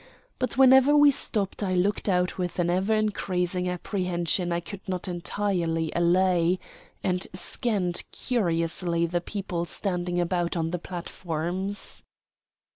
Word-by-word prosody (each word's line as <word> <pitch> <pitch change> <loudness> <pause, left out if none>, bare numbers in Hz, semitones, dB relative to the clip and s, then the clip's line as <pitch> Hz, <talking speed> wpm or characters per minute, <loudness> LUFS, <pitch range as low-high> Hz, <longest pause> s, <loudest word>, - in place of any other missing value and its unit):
But 255 -2 -1
whenever 265 +2 +7
we 290 -1 +7
stopped 215 -8 -2
I 185 -2 0
looked 200 +3 +1
out 180 0 +1
with 175 -2 -3
an 175 -1 +1
ever 190 +4 +1
increasing 180 -4 -1
apprehension 180 -1 0
I 170 - +1
could 195 +3 -8
not 185 0 -2
entirely 175 -3 -1
allay, 175 0 +3 0.5
and 180 0 0
scanned 185 -2 0
curiously 170 -6 0
the 175 +1 -1
people 185 -3 -4
standing 175 -1 -2
about 175 0 0
on 165 0 -1
the 180 - -2
platforms. 175 +2 -4
180 Hz, 125 wpm, -26 LUFS, 175-200 Hz, 0.5 s, whenever